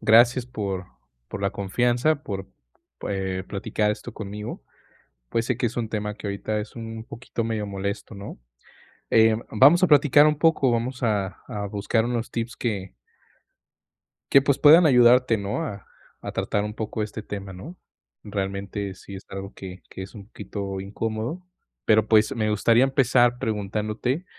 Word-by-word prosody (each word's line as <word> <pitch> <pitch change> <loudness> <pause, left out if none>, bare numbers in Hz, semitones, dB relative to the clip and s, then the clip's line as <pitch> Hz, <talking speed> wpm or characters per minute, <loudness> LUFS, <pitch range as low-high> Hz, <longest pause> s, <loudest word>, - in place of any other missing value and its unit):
gracias 120 +2 +5
por 100 -7 -4 0.4
por - - -6
la 100 0 0
confianza, 120 +9 +1
por, 95 -7 -5 0.6
eh, 95 -1 -2
platicar 105 +1 -1
esto 105 +3 -5
conmigo, 105 0 -7 0.7
pues, 115 0 0
sé 125 - 0
que 125 +1 0
es 120 - -7
un 115 -2 -1
tema 105 -1 -3
que 105 - -7
ahorita 100 +2 -2
es 105 +1 -7
un 115 -1 -7
poquito 115 -1 -5
medio 110 -2 -2
molesto, 100 +2 -4
¿no? 100 0 -8 0.7
Em, 110 0 +4
vamos 145 - +6
a 185 - +5
platicar 145 0 +6
un 150 -1 0
poco, 155 -4 +3
vamos 120 +2 -2
a 100 -4 0
a 100 -1 -4
buscar 105 +2 0
unos 120 -1 -2
tips 115 0 -3
que 100 -6 -3 1.4
que, 135 - +7
pues, 140 0 +2
puedan 160 +4 +8
ayudarte, 125 -3 +5
¿no?, 100 +9 -3
a 100 -10 -6 0.3
a - - -6
tratar 105 - -1
un 105 0 -4
poco 110 0 -3
este 110 +1 -6
tema, 100 -2 -7
¿no? 160 - -10 0.5
Realmente 100 0 -4
sí 100 - -12
es 95 - -8
algo 95 0 -7
que 95 -1 -10
que - - -9
es 95 +3 -9
un 100 -2 -10
poquito 100 -2 -6
incómodo, 110 - -4 0.4
pero, 110 0 +4
pues, 110 -1 +4
me 110 -2 0
gustaría 115 +3 +4
empezar 125 -2 +3
preguntándote, 110 - -2
110 Hz, 160 wpm, -24 LUFS, 100-120 Hz, 1.4 s, puedan